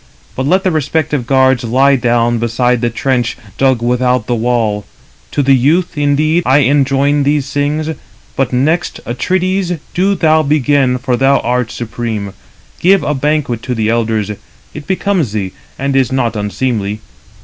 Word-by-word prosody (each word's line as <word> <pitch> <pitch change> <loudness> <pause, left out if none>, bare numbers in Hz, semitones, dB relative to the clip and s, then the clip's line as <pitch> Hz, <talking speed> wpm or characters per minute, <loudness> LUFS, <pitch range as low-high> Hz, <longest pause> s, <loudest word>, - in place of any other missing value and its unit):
But 130 +1 -2
let 185 +4 +2
the 185 - +1
respective 150 -3 -1
guards 130 -1 +3
lie 135 +4 +3
down 120 -2 +1
beside 120 +1 0
the 120 - +1
trench, 120 0 -1 0.2
dug 130 -3 +2
without 125 -1 +1
the 120 - -1
wall. 115 -3 0 0.5
To 145 - -1
the 135 0 +4
youth, 160 +8 +2
indeed, 150 +3 +1
I 135 +1 +4
enjoin 140 +1 +2
these 145 0 0
things; 145 +2 -1 0.5
but 135 -2 0
next, 155 +7 0
Atrides, 185 +7 -1 0.2
do 195 +3 +1
thou 160 -3 +3
begin, 140 -3 +2
for 125 0 -1
thou 135 +2 +3
art 125 -1 -1
supreme. 110 -4 -4 0.5
Give 195 +2 +3
a 150 - 0
banquet 140 -4 -1
to 125 0 -3
the 110 -1 0
elders; 110 -3 0 0.4
it 145 - -9
becomes 190 - 0
thee, 100 -3 -2 0.3
and 135 0 -1
is 130 -3 +2
not 120 -4 0
unseemly. 105 0 -2
130 Hz, 155 wpm, -14 LUFS, 120-150 Hz, 0.5 s, the